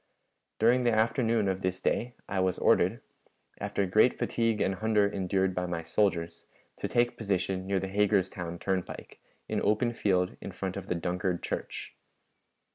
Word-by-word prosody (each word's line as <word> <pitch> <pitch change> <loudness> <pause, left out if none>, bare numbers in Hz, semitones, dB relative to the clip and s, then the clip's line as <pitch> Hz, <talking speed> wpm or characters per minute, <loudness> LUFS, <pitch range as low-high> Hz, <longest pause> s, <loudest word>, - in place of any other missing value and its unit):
During 120 +3 +4
the 120 -1 +3
afternoon 110 -1 +2
of 95 0 -1
this 95 0 -1
day 120 +1 -1
I 100 - -1
was 95 -1 +1
ordered, - - +3 0.6
after 100 - -1
great 110 +6 +4
fatigue 115 -2 0
and 95 - +1
hunger 105 +1 +2
endured 95 -1 0
by 90 0 -2
my 85 -1 -3
soldiers, 85 -2 0 0.3
to - - -3
take 120 0 +1
position 95 -3 -1
near 100 -1 +1
the 95 - -3
Hagerstown 95 -3 0
turnpike, 95 0 -4 0.3
in - - -1
open 110 +3 +2
field 90 -5 +1
in 100 - -7
front 95 +1 -4
of 100 -1 -6
the 90 - -1
Dunkard 90 +1 -2
church. - - -5
95 Hz, 160 wpm, -29 LUFS, 90-110 Hz, 0.6 s, During